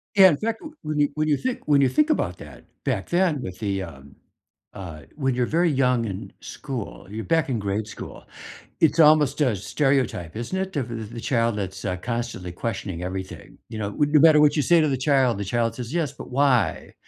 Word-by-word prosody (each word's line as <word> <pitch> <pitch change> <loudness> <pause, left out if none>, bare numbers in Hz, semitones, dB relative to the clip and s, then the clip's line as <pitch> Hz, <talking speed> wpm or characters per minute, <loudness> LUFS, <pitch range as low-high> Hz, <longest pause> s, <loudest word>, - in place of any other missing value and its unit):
Yeah, 190 -1 +9
in 145 - 0
fact, 225 0 -2
w 310 0 -11
when 155 -1 -2
you 145 - +3
when 155 0 0
you 145 -2 +2
think 255 -9 -4
when 145 -2 +4
you 135 - +4
think 305 +1 +2
about - - -1
that - - -13 0.2
back - - -2
then 175 -6 +1
with 90 -5 -7
the, 100 -3 -2
um, 70 -5 -10 0.6
uh 80 -6 -9
when 135 -3 0
you're 125 -1 +1
very 170 +4 +2
young 125 -3 +2
in 95 -3 -6
school 125 -6 -7
you're 110 +2 -5
back 165 -4 +1
in 120 - 0
grade 100 +2 -2
school, 105 - -9 0.6
it's 160 +1 +3
almost 150 -1 +5
a 125 -7 +2
stereotype, 125 - -1
isn't 120 +11 -4
it, 190 -3 -3
of 115 -4 -4
the 115 -1 -7
child 115 -4 +1
that's, 95 -1 -5
uh, 90 - -1
constantly 115 -4 -4
questioning 95 -3 -4
everything? 95 +1 -7
You 110 - -6
know, 100 -1 -2
would 145 +6 0
no 150 - +7
matter 155 -1 +7
what 150 0 +4
you 150 - +2
say 170 -2 +5
to 155 - +2
the 135 - 0
child, 130 -5 +2
the 100 - -3
child 115 +2 0
says, 125 +3 -6
"Yes, 160 -6 0
but - - -10
why?" 135 -2 +1
125 Hz, 220 wpm, -24 LUFS, 105-150 Hz, 0.6 s, Yeah